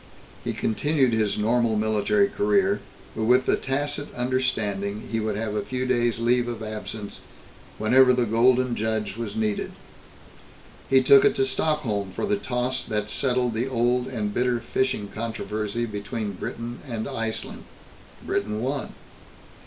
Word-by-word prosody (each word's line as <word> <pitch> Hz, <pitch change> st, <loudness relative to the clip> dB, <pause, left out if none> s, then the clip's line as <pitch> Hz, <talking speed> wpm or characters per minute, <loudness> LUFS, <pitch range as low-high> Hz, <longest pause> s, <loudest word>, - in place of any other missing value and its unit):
He -, -, -2 dB
continued 135 Hz, +2 st, +1 dB
his 110 Hz, -2 st, +1 dB
normal 115 Hz, +1 st, +2 dB
military 110 Hz, -, +2 dB
career, 200 Hz, -1 st, +2 dB, 0.4 s
but 110 Hz, -, -1 dB
with 125 Hz, +2 st, +4 dB
the -, -, +3 dB
tacit 145 Hz, +2 st, -2 dB
understanding 110 Hz, -5 st, -1 dB
he 115 Hz, -, 0 dB
would 110 Hz, -1 st, -1 dB
have 105 Hz, 0 st, -2 dB
a 105 Hz, -, 0 dB
few 130 Hz, 0 st, -3 dB
days' 120 Hz, -2 st, +1 dB
leave 120 Hz, +1 st, +2 dB
of 115 Hz, -2 st, -4 dB
absence 110 Hz, -1 st, -6 dB, 0.6 s
whenever 125 Hz, +4 st, +5 dB
the 125 Hz, -1 st, +2 dB
Golden 120 Hz, +2 st, +3 dB
Judge 110 Hz, -2 st, -1 dB
was 110 Hz, -3 st, -5 dB
needed. 110 Hz, -2 st, -1 dB, 1.2 s
He 130 Hz, -1 st, +5 dB
took 135 Hz, +1 st, +7 dB
it -, -, +4 dB
to 135 Hz, -, +2 dB
Stockholm 130 Hz, -8 st, 0 dB
for -, -, -1 dB
the 205 Hz, 0 st, +1 dB
toss 125 Hz, -7 st, -2 dB
that 105 Hz, -1 st, -2 dB
settled 125 Hz, -3 st, +1 dB
the 115 Hz, +4 st, -1 dB
old 125 Hz, 0 st, +1 dB
and 105 Hz, -5 st, -3 dB
bitter 125 Hz, 0 st, +1 dB
fishing 120 Hz, -2 st, -1 dB
controversy 110 Hz, 0 st, -3 dB
between 105 Hz, 0 st, -4 dB
Britain 115 Hz, +5 st, -6 dB
and 115 Hz, -3 st, -3 dB
Iceland. 115 Hz, -1 st, -4 dB, 0.6 s
Britain 105 Hz, +1 st, -1 dB
won. 135 Hz, +1 st, -3 dB
120 Hz, 145 wpm, -25 LUFS, 110-130 Hz, 1.2 s, took